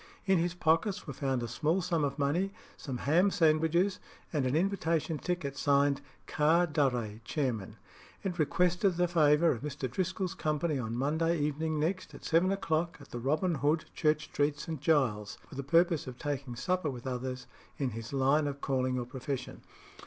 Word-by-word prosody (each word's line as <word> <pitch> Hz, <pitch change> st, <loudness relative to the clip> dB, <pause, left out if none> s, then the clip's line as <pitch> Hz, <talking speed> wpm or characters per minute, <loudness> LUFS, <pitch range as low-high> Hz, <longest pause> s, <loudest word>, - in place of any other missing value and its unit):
In 190 Hz, -3 st, +4 dB
his 170 Hz, +1 st, -1 dB
pockets 180 Hz, +5 st, +1 dB
were 140 Hz, -, -6 dB
found 130 Hz, -2 st, -1 dB
a -, -, -2 dB
small 155 Hz, +9 st, 0 dB
sum 170 Hz, -4 st, 0 dB
of 140 Hz, -1 st, -1 dB
money, 160 Hz, +7 st, +1 dB, 0.2 s
some 130 Hz, -4 st, -5 dB
ham 170 Hz, +10 st, +3 dB
sandwiches, 170 Hz, +2 st, +2 dB, 0.3 s
and 140 Hz, -4 st, +1 dB
an 130 Hz, -, 0 dB
invitation 165 Hz, -3 st, 0 dB
ticket 175 Hz, -6 st, -2 dB
signed 140 Hz, -1 st, +2 dB, 0.2 s
"Car 160 Hz, +3 st, +3 dB
Durre, 125 Hz, -9 st, 0 dB
chairman." 110 Hz, -6 st, -2 dB, 0.5 s
It 180 Hz, -3 st, -3 dB
requested 180 Hz, +4 st, +2 dB
the 180 Hz, 0 st, +3 dB
favour 160 Hz, -1 st, +4 dB
of 115 Hz, -, -3 dB
Mr. 140 Hz, -2 st, -3 dB
Driscoll's 185 Hz, +7 st, -2 dB
company 155 Hz, -1 st, -1 dB
on 115 Hz, -1 st, -3 dB
Monday 160 Hz, +5 st, +1 dB
evening 150 Hz, +1 st, -1 dB
next, 185 Hz, +5 st, -2 dB
at -, -, -12 dB
seven 170 Hz, +4 st, +3 dB
o'clock, 170 Hz, -3 st, -1 dB
at 140 Hz, -, -15 dB
the 120 Hz, -, -4 dB
Robin 155 Hz, +8 st, +1 dB
Hood, 150 Hz, +2 st, +1 dB
Church 155 Hz, -1 st, +1 dB
Street, 145 Hz, 0 st, 0 dB
St. 160 Hz, -4 st, -5 dB
Giles's, 125 Hz, -10 st, +1 dB
for -, -, -14 dB
the 140 Hz, -, -3 dB
purpose 165 Hz, +2 st, +2 dB
of 125 Hz, -1 st, -7 dB
taking 140 Hz, -4 st, -4 dB
supper 180 Hz, +4 st, 0 dB
with 125 Hz, -2 st, -7 dB
others 125 Hz, 0 st, -4 dB, 0.3 s
in 135 Hz, -3 st, -1 dB
his 115 Hz, +1 st, -7 dB
line 140 Hz, +2 st, +3 dB
of 140 Hz, 0 st, -4 dB
calling 130 Hz, -2 st, 0 dB
or 125 Hz, -, -2 dB
profession. 130 Hz, +2 st, -5 dB
150 Hz, 175 wpm, -31 LUFS, 135-170 Hz, 0.5 s, In